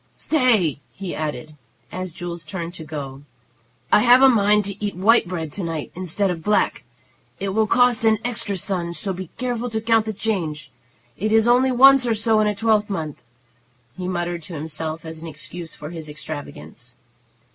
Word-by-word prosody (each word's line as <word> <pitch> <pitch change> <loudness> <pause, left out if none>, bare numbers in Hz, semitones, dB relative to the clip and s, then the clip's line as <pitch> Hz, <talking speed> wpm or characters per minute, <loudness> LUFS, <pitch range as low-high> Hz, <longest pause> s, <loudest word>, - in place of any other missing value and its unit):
Stay!" 230 - +2
he 190 -2 -6
added, 155 -1 -4 0.4
as 185 -1 -5
Jules 170 0 -6
turned 170 +2 -5
to 165 - -9
go. 140 -3 -7 0.7
"I - - +7
have 245 +3 +6
a - - +10
mind 210 -3 +3
to 200 +1 -5
eat 205 -3 -2
white 215 +3 +4
bread 165 -4 -4
to 195 - -4
night 165 -3 -4
instead 185 +2 -1
of 165 -2 -5
black. 210 +3 +1 0.6
It 195 - -2
will 215 +3 +1
cost 245 0 +3
an 220 -1 +4
extra 210 -5 -2
son, 175 -2 -2
so 195 +1 -3
be 185 -2 -7
careful 245 -1 -2
to 220 -1 -2
count 225 0 +2
the 220 - -2
change. 165 -9 -3 0.5
It 215 +3 -1
is 225 +1 +4
only 255 +2 +4
once 265 0 +7
or 230 - +2
so 220 0 +2
in 215 - +3
a 210 - 0
twelvemonth," 205 -8 0 0.7
he 180 -1 -5
muttered 175 -1 -2
to 165 +2 -9
himself 155 +1 -4
as 160 0 -7
an 165 - -8
excuse 165 +2 -7
for 150 +2 -8
his 160 -3 -7
extravagance. 125 - -8
185 Hz, 180 wpm, -22 LUFS, 160-220 Hz, 0.7 s, a